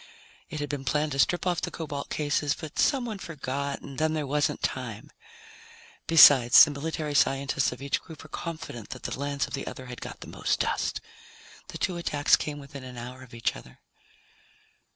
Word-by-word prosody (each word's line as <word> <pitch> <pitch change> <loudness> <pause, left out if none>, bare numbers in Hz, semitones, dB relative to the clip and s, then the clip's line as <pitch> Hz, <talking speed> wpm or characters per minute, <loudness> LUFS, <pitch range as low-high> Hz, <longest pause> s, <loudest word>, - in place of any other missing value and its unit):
It 155 - -5
had 145 - -2
been 145 -2 -4
planned 150 +3 0
to 135 - -3
strip 175 +6 +2
off 180 -2 +1
the - - -2
cobalt 145 -3 -5
cases, 145 -1 0
but 155 -3 -7
someone 240 -7 +1
forgot 140 -4 -4
and 140 -2 -8
then 155 0 +1
there 150 -2 -1
wasn't 145 +1 0
time. 115 -5 -4 1.0
Besides, 140 -7 +9
the 150 - -4
military 150 +1 -3
scientists 135 -1 +2
of - - -8
each 140 - 0
group 160 -3 -12
were 155 - -13
confident 155 - -6
that 125 - -8
the - - -4
lands 140 0 -1
of - - -11
the 135 - -4
other 130 - -7
had 125 -1 -9
got - - -8
the - - -8
most - - -1
dust. - - -1 0.7
The - - -7
two 180 - -1
attacks 145 -4 +3
came 150 -1 -4
within 140 -1 -10
an 125 -1 -9
hour 125 +2 -8
of 125 -2 -12
each 115 - -1
other. 60 - -13
145 Hz, 195 wpm, -27 LUFS, 130-155 Hz, 1.0 s, Besides